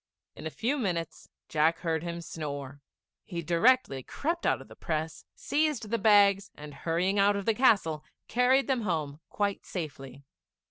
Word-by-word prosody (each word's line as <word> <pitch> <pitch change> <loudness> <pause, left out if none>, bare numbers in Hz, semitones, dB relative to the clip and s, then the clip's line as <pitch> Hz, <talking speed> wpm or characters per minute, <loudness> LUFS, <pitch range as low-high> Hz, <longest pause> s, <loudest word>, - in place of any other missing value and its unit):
In 160 - -6
a - - -3
few 250 - -1
minutes 170 - -3 0.2
Jack 160 +2 +2
heard 160 -2 -1
him 170 0 -5
snore. 145 -4 -6 0.4
He 170 -3 -5
directly 170 - +3
crept 335 - -2
out - - +2
of - - -12
the - - -13
press, 160 0 -4
seized 290 -8 -1
the 230 - +1
bags, 200 -2 +5
and 150 0 -10
hurrying 180 +6 0
out 200 +1 +4
of 200 -1 -3
the 225 - +3
castle, 195 - +3 0.2
carried 255 +3 +3
them 260 -3 0
home 155 -7 -2
quite 205 -1 -1
safely. 140 -6 -7
175 Hz, 160 wpm, -29 LUFS, 155-220 Hz, 0.4 s, bags